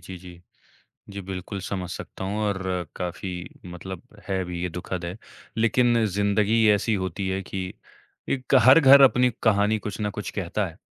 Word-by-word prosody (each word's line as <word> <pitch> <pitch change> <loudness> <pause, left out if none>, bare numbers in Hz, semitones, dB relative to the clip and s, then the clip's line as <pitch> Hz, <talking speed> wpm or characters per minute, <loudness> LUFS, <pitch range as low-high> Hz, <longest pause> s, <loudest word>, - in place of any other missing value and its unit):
जी, 95 - -9
जी। 90 -1 -13 0.7
जी, 100 0 -6
बिल्कुल, 95 +1 -6
समझ 95 -2 -4
सकता 90 - -7
हूँ, 100 +2 -3
और 95 -4 -2
काफ़ी 90 0 -6
मतलब 90 +1 -8 0.3
है 95 -1 -1
भी, 90 -1 -5
ये 90 - -1
दुखद 90 +1 -5
है, 90 +4 -6 0.4
लेकिन 115 0 +3
ज़िंदगी 105 +2 +2
ऐसी 105 +2 +1
होती 95 0 -2
है 95 +1 -2
कि 95 0 -5 0.6
एक 130 -2 0
हर 130 +5 +9
घर 140 -2 +8
अपनी 125 -2 +5
कहानी 105 -1 +3
कुछ 105 0 -6
न 105 - 0
कुछ - - -6
कहता - - -2
है, - - -12
95 Hz, 170 wpm, -25 LUFS, 90-110 Hz, 0.7 s, हर